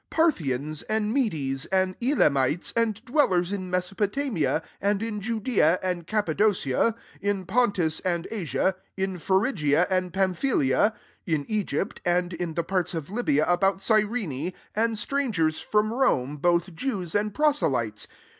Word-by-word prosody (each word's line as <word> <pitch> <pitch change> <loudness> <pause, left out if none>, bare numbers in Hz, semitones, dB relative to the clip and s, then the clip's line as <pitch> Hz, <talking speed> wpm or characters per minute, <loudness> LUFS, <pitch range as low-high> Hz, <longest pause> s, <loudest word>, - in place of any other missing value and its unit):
9 - - -10
Parthians, 155 - +1
and 215 0 0
Medea, 155 - 0
and 185 -1 +2
Elamites, 150 - +2
and 230 -1 0
dwellers 190 - +2
in 190 -2 -3
Me 180 - +1
sopotamia, 195 - -1 0.2
and 205 +1 +1
in 215 -2 -3
Judeaf 220 -6 +2
and 180 -3 -2
Cappadocia, 210 - +1 0.3
in 200 -2 -1
Pontus 190 -7 +1
and 175 -2 -2
Asia» 190 -2 0 0.2
10 190 0 0
in 185 - -6
Phrygia 185 - +2
and 185 -1 0
Pamphylia^ 190 - +1 0.3
in 155 -4 0
Egypt 205 -2 -2
and 175 0 +1
in 170 -2 -4
the 170 - 0
parts 185 -1 -1
of 160 +2 -5
Libya 180 -10 +1
about 195 +2 +2
Cyrene, 205 - 0 0.2
ana 225 +1 +1
strang 255 -2 -1
ers 155 -1 +1
from 215 +1 +1
Rome, 150 - +1
both 175 +3 +1
Jews 185 -4 -3
and 210 +1 +1
proselytes. 135 - 0
190 Hz, 145 wpm, -26 LUFS, 165-220 Hz, 0.3 s, and